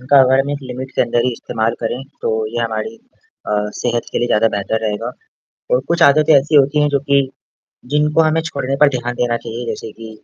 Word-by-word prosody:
उनका 135 +2 +5
अगर 130 +1 +4
हम 140 +1 -2
एक 145 - -2
लिमिट 130 +1 -6
के - - +3
अंदर 120 0 0
ही 125 - +2
इस्तेमाल 115 -1 -2
करें, 120 +3 -3 0.2
तो - - 0 0.2
ये - - -1
हमारी 115 - -3 0.5
अ, - - -4 0.3
सेहत 120 -1 0
के - - 0
लिए 120 - 0
ज़्यादा 115 +1 +3
बेहतर 100 +2 -1
रहेगा 105 +2 -3 0.6
और - - +4
कुछ 170 - 0
आदतें 150 +2 +5
ऐसी 140 +3 +3
होती 145 +1 +4
हैं 150 - +2
जो 140 -1 +1
कि 140 0 +5 0.7
जिनको 150 +2 +3
हमें 160 0 +2
छोड़ने 140 -4 -3
पर 150 - +8
ध्यान 120 0 -3
देना 120 -1 0
चाहिए, 115 +1 -6
जैसे 115 -1 -5
कि, 115 +1 -11
125 Hz, 215 wpm, -18 LUFS, 115-145 Hz, 0.7 s, पर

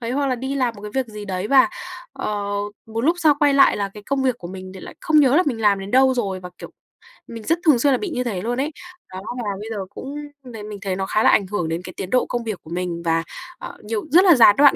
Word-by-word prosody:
Đấy 235 0 -4
hoặc 280 +1 0
là 255 - +1
đi 265 +3 -4
làm 250 -4 0
một 205 - -12
cái 210 - -6
việc 265 -2 0
gì 210 -1 -8
đấy 190 0 -3
và, 270 -2 +6 0.4
ờ, 205 -1 -3 0.4
một 225 0 -4
lúc 335 +4 +3
sau 315 -4 +4
quay 290 -1 +4
lại 275 - +5
là 200 -1 -2
cái 210 - -10
công 275 -1 0
việc 255 -2 0
của 175 - -8
mình 185 0 -8
thì 190 - -9
lại - - -10
không 310 -1 +4
nhớ 275 0 +4
là 360 - +5
mình 235 -5 -1
làm 205 -2 +3
đến 195 +1 -7
đâu 260 +2 +4
rồi, 195 -6 -2
và, 180 0 -9
kiểu, - - -9 0.6
mình 230 -1 -8
rất 330 +8 +1
thường 295 -7 +5
xuyên 280 +3 +3
là - - +2
bị 405 - -4
như 250 -6 -2
thế 210 -7 -3
luôn 240 +4 -2
ấy. 285 +4 -1 0.4
Đó, 185 - -6 0.2
và 210 - -2
bây 215 +2 -7
giờ 220 - -4
cũng 275 +7 -8 0.3
mình 250 -3 -11
thấy 215 -2 -7
mình 210 -1 -8
thấy 190 -3 -2
nó 190 - -2
khá 215 +3 +1
là - - +6
ảnh 200 - +3
hưởng 180 -5 -2
đến 165 +2 -2
cái 185 - -9
tiến 185 - -5
độ 250 +3 +2
công 240 -1 -3
việc 215 -5 -4
của - - -14
mình, 175 -1 -3
và, 165 0 +1 0.4
ờ, - - -9
nhiều 215 0 -3
rất 355 +5 +7
là 350 -5 +7
gián 225 -4 +7
đoạn 285 -1 +6
225 Hz, 300 wpm, -21 LUFS, 195-265 Hz, 0.6 s, rất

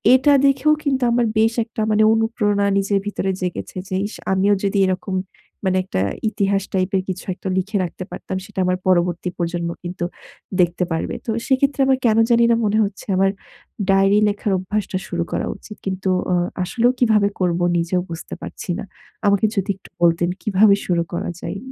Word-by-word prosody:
এটা 275 +3 +4
দেখেও 275 +3 +3
কিন্তু 270 -4 0
আমার 240 0 +2
বেশ 225 +1 +3
একটা 225 -1 -5
মানে 215 0 +4
অনুপ্রেরণা 225 -3 +1
নিজের 200 0 +1
ভিতরে 195 -2 -1
জেগেছে 180 0 -4
যে 185 - -2
ইস, 215 - -10 0.2
আমিও 195 +2 +3
যদি 200 0 0
এরকম 185 +1 -2 0.5
মানে 185 0 +2
একটা 95 - -2 0.3
ইতিহাস 200 -1 0
টাইপের 190 0 +1
কিছু 185 0 -4
একটা 190 - -8
লিখে 200 +3 -1
রাখতে 180 +1 -5
পারতাম। 190 - -5
সেটা 210 -2 -7
আমার 180 0 +1
পরবর্তী 175 -1 +2
প্রজন্ম 170 0 -2
কিন্তু 175 0 -4 0.6
দেখতে 175 +1 +1
পারবে। 165 - -2
তো 225 - -1 0.2
সেক্ষেত্রে 275 +1 +2
আমার 265 - +4
কেনো 225 -1 +4
জানিনা 235 0 +5
মনে 210 +1 +1
হচ্ছে, 200 0 -7
আমার 195 +1 +3 0.6
ডায়রি 195 +1 +4
লেখার 205 0 -2
অভ্যাসটা 190 +1 -2
শুরু 170 -1 -1
করা - - -1
উচিত। 210 +2 -11
কিন্তু 190 0 -2 0.2
অ - - +3 0.3
আসলেও 235 +6 +2
কীভাবে 215 -4 +4
করবো? 175 -1 +1
নিজেও 175 +2 0
বুঝতে 165 - -7
পারছি - - -8
না। 220 - -4 0.4
আমাকে 200 +1 +3
যদি 195 0 -1
একটু - - -17
বলতেন 170 0 +3
কীভাবে 205 -1 +5
শুরু 170 -2 +2
করা 170 - -2
যায়? - - -4
195 Hz, 175 wpm, -21 LUFS, 185-220 Hz, 0.6 s, জানিনা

